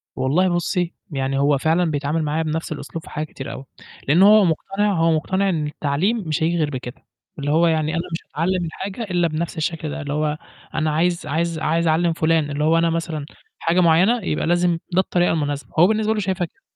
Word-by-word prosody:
والله 165 +8 +2
بُصّي، 175 0 -1 0.2
يعني 135 -1 -1
هو 140 0 +3
فعلًا 160 +4 +1
بيتعامل 150 +2 -1
معايا 155 +2 -1
بنفس 160 +1 -3
الأسلوب 160 +1 -6
في - - -12
حاجات 155 +1 -4
كتيرة 135 0 -7
أوي. 135 - -8 0.4
لأن 160 +7 +5
هو 210 0 +7
مقتنع 195 +5 0
هو 165 -2 +2
مقتنع 190 +5 +1
إن 155 -5 -1
التعليم 150 +9 0
مش 155 0 -1
هييجي 170 +2 +1
غير 155 -3 +1
بكده. 125 -3 -7 0.4
اللي 145 0 -1
هو 165 +3 +4
يعني 160 -1 +1
أنا 165 - 0
مش 165 - -2
هاتعلم 175 +3 -1
الحاجة 190 +7 -5
إلا 175 -5 +1
بنفس 165 +2 -3
الشكل 160 0 -2
ده. 160 +2 -5
اللي 145 -1 -4
هو 150 0 0 0.4
أنا 155 0 0
عايز 170 +3 0
عايز 165 +2 -1
عايز 165 +2 +1
أعلّم 165 +1 +2
فلان 160 -2 +1
اللي 145 +1 -2
هو 160 +2 +4
أنا 165 0 +3
مثلًا 165 -3 -3 0.3
حاجة 170 +2 +1
معيّنة، 180 +8 +4
يبقى 150 - -1
لازم 175 0 +2
ده 185 - +3
الطريقة 175 -1 +1
المناسبة، 145 -2 -2
هو 175 - +7
بالنسبة 220 +1 +1
له 215 - -2
شايفها 190 -2 -1
كده. 395 - -20
165 Hz, 210 wpm, -21 LUFS, 150-175 Hz, 0.4 s, هو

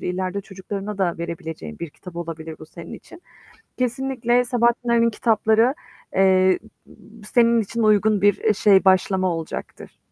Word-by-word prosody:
İleride 185 +2 -3
çocuklarına 195 +1 -7
da 175 -3 0
verebileceğin 160 - -7
bir 170 - -6
kitap 175 +3 -13
olabilir 165 -2 -6
bu 155 - -12
senin 170 +1 -11
için. 345 - -14 0.6
Kesinlikle 250 -1 0
Sabahattin 240 0 0
Ali'nin 235 0 +3
kitapları, 225 +2 +2 0.4
eee, 185 -1 +4 0.8
senin 235 -1 +4
için 230 +2 -3
uygun 215 -1 +3
bir, 205 -1 +4
eee, 215 - +1
şey 195 -2 +4
başlama 185 -1 +2
olacaktır. 165 -1 -8
200 Hz, 135 wpm, -22 LUFS, 180-230 Hz, 0.8 s, eee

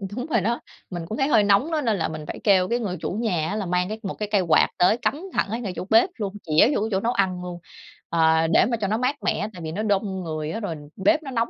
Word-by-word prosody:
đúng 250 +1 -3
rồi 230 -9 +1
đó, 235 +5 0 0.3
mình 175 -3 -5
cũng 220 - -3
thấy 270 - +1
hơi 220 -8 +4
nóng 205 +11 +3
á, 310 - 0
nên 225 -7 +1
là 165 - 0
mình 155 -1 -7
phải - - -6
kêu 190 -3 +4
cái 235 +3 0
người 190 -6 -3
chủ - - -3
nhà 185 -7 -1
á, 205 - -2
là 210 -2 -2
mang 180 +1 0
cái 220 +1 -5
một 195 - -3
cái 210 - -4
cây 205 - +3
quạt 170 -3 +4
tới 180 +6 +4
cắm 285 +6 -1
thẳng - - 0
ở 225 - -2
ngay 210 -7 -4
chỗ 180 - -5
bếp 225 +11 +5
luôn, 200 -3 -3
chĩa 160 +6 +4
vô - - 0
cái 220 - -1
chỗ 190 - +1
nấu 235 +4 0
ăn 185 -4 0
luôn, 175 -1 -6 0.5
à, 160 -1 +3
để - - +6
mà 235 0 -1
cho 205 -3 -2
nó 215 +2 0
mát 255 +4 0
mẻ. 205 - 0
Tại 175 - -10
vì 160 -1 -5
nó 210 +6 -3
đông 195 -3 -1
người 155 -1 -4
á, 225 - -3
rồi 190 -7 -4 0.2
bếp 310 +9 +2
nó 270 - -6
nóng 230 -2 0
200 Hz, 305 wpm, -24 LUFS, 180-230 Hz, 0.5 s, để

